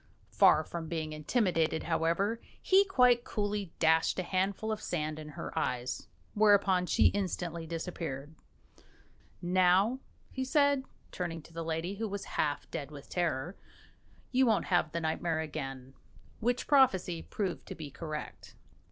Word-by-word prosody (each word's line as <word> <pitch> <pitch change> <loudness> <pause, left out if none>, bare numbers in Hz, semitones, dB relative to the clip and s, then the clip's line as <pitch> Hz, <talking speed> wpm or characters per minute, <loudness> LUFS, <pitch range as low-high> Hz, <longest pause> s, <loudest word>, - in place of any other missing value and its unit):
Far 155 - +5
from 165 0 -6
being 155 -2 -3
intimidated, 160 -1 +1
however, 170 +7 0 0.2
he 390 +1 +5
quite 250 -10 +4
coolly 205 -5 -2
dashed 160 0 +3
a 185 - 0
handful 195 +4 -1
of 215 0 -3
sand 155 -4 -3
in 155 -1 -8
her - - -6
eyes, 125 0 -2 0.3
whereupon 200 -4 +4
she - - +5
instantly 175 -4 -3
disappeared. 160 -4 -5 1.1
"Now," 185 +7 +3 0.3
he 260 - -3
said, 285 -1 +3 0.3
turning 165 -3 -4
to 165 - -16
the 165 0 -4
lady, 165 +4 -3
who 225 +1 -2
was 200 0 -4
half 145 -2 -1
dead 145 -4 -4
with 145 -2 -12
terror, 175 -1 -1 0.8
"you 260 0 +4
won't 220 -3 +2
have 170 -3 +3
the 170 - -2
nightmare 160 0 -1
again" 135 -4 -5 0.5
which 245 +2 0
prophecy 190 - +3
proved 190 -5 -4
to - - -6
be 150 -3 -8
correct. 155 +1 -7
175 Hz, 145 wpm, -31 LUFS, 160-205 Hz, 1.1 s, Far